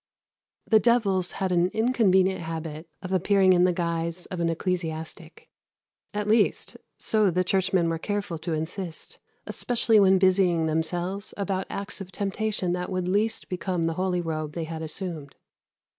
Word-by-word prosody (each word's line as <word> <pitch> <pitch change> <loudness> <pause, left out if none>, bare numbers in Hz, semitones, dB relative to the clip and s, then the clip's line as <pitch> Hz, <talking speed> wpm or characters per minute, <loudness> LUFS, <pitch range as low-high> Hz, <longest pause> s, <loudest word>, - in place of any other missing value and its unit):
The 220 - +5
devils 200 -6 +2
had 190 -1 -2
an 175 0 +3
inconvenient 195 -6 +3
habit 160 0 -6
of 185 - -5
appearing 190 0 +4
in 180 0 +4
the 180 - +3
guise 170 0 -2
of 185 - -4
an 170 -1 +1
ecclesiastic 165 -2 -4 0.6
at 210 0 -3
least, 215 0 +2 0.2
so 215 -3 +2
the 180 +1 +1
churchmen 185 -2 +1
were 165 -1 -1
careful 200 -3 -3
to 165 0 -3
insist, 160 +2 -5 0.3
especially 230 -2 +2
when 190 -1 +6
busying 185 -3 +3
themselves 175 +5 -2
about 195 -2 -2
acts 200 0 -4
of 190 -1 -8
temptation 200 -1 -1
that 180 0 -3
would 185 -1 -2
least 210 +4 +1
become 180 -1 -2
the 165 0 0
holy 180 0 0
robe 155 -2 -3
they 170 - -3
had 160 0 -6
assumed. 160 -3 -5
185 Hz, 155 wpm, -26 LUFS, 165-195 Hz, 0.6 s, when